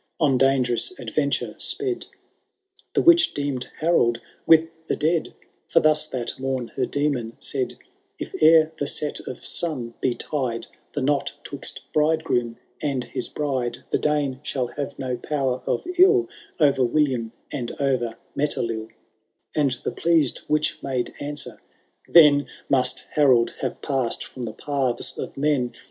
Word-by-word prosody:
On 145 -4 +3
dangerouB 135 - +2
adventure - - -1
sped. 395 -3 -1 0.9
The - - +3
witch 340 -1 +6
deemed 140 -3 -2
Harold 135 -8 +3 0.3
with 165 0 +6 0.2
the - - 0
dead, 160 +2 0 0.3
For - - +4
thus 155 0 +3
that 120 -3 -4
mom 130 -2 -2
her - - -2
Demon 140 -6 -1
said: 130 -3 -3 0.2
— - - -43
I^ - - -6
ere 160 0 +7
the 145 - -1
set 150 0 -2
of 125 - -6
sun, 130 -9 -1
be 125 -2 +1
tied 130 -6 -3
* - - -39
The 145 - -1
knot 140 0 +1
twixt 140 - -3
bridegroom 150 -7 +1 0.2
and 140 -4 -1
his - - -4
bride, 130 -5 -2
The - - +2
Dane 145 -3 0
shall 130 -3 -2
have 145 -1 -4
no 125 -2 -3
power 135 -1 -1
of - - 0
ill 380 -1 +6 0.3
0*er 140 -4 +4
William 125 -3 +1 0.2
and 125 -5 -3
o'er 125 -5 0 0.2
MetelilL" 115 -6 -1 0.6
And 140 -5 +1
the - - -1
pleased 165 -6 +2
witch 150 0 0
made 130 -3 -2
answer, 145 -6 -5 0.5
^ - - -19
Then 150 -4 +7 0.2
Must 130 -2 +2
Harold 130 -6 +4
have - - -4
passed 135 -5 0
from 130 - -10
the 115 -3 -4
paths 130 -1 -1
of - - -6
men 135 -4 +1
140 Hz, 150 wpm, -24 LUFS, 125-150 Hz, 0.9 s, ere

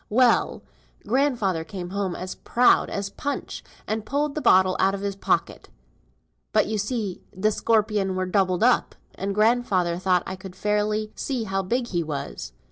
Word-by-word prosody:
"Well! 240 +2 +3 0.4
grandfather 225 - +1
came 180 +1 -7
home 195 -2 -2
as 185 +1 -5
proud 245 +1 +3
as 200 0 -3
Punch, 285 +7 -4 0.2
and 220 0 -2
pulled 285 +5 -1
the 305 - -3
bottle 185 -5 +5
out 195 +1 +3
of 195 - -6
his 200 -1 -2
pocket. 195 - -1 0.8
But - - +3
you 215 0 -2
see 210 -3 -3 0.2
th' 215 +2 +2
scorpion 210 -4 +1
were 185 0 -1
doubled 185 0 +1
up, 250 0 +3 0.2
and 195 +1 -3
grandfather 210 -6 +2
thought 180 -1 +2
I 190 - -5
couldn't 185 -1 -10
fairly 210 +1 0
see 260 -5 -3
how 195 -2 -1
big 235 +6 -1
he 175 -2 0
was. 140 - -5
200 Hz, 165 wpm, -24 LUFS, 185-225 Hz, 0.8 s, bottle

